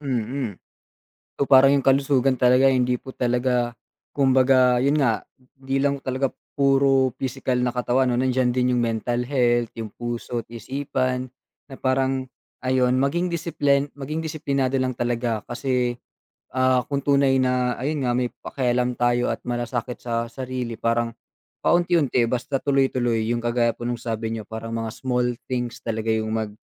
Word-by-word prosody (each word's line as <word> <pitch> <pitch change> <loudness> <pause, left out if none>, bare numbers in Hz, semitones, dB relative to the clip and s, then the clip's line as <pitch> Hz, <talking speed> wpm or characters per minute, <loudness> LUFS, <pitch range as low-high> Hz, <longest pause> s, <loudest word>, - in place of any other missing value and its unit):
Mm. 125 -3 -2 0.8
So, 140 - -1
parang 135 +1 +7
yung 140 - +2
kalusugan 135 -1 +3
talaga 125 +2 +5
hindi 125 -1 +2
po 130 - -10
talaga 125 -1 0 0.4
kumbaga, 130 -2 +4
yun 140 +2 +3
nga, 120 -6 +1 0.3
di 135 0 -2
lang 140 0 +1
talaga 130 +1 -1 0.3
puro 135 -1 +4
pisikal 130 -1 -2
na 125 0 +1
katawan 125 +1 +1
'no, 120 - 0
nandiyan 130 -1 +2
din 125 0 +2
yung 120 - +1
mental 120 +1 -1
health, 120 -3 +1
yung 110 -2 -5
puso 120 0 -4
at - - -32
isipan. 130 +1 -2 0.4
Na - - -7
parang 130 0 0 0.4
ayun, 130 0 +2
maging 170 +7 0
disiplin 145 -4 +1
maging 145 +3 -5
disiplinado 140 -4 -1
lang 130 -1 -1
talaga 120 -2 -1
kasi, 125 -1 -1 0.6
ah, 130 -1 +3
kung 140 -1 -1
tunay 140 -1 +3
na 125 -1 +1
ayun 145 +2 -2
nga, - - +2
may 125 0 +1
pakialam 125 -1 -1
tayo 120 0 +1
at - - -4
masasakit 120 0 -3
sa 115 -1 -1
sarili 125 -2 -4
parang 115 0 0 0.5
paunti-unti 170 -8 +3
basta 125 +3 -1
tuloy-tuloy. 130 -5 +1
Yung 120 - 0
kagaya 120 0 +2
po - - -9
nung 120 0 -2
sabi 115 -1 -3
niyo 115 -1 -4
parang 110 0 -6
mga 115 -1 -3
small 125 -1 -1 0.2
things 120 -1 -2
talaga 110 -1 -3
yung 110 0 -1
mag 110 -1 -2
125 Hz, 155 wpm, -23 LUFS, 120-135 Hz, 0.8 s, parang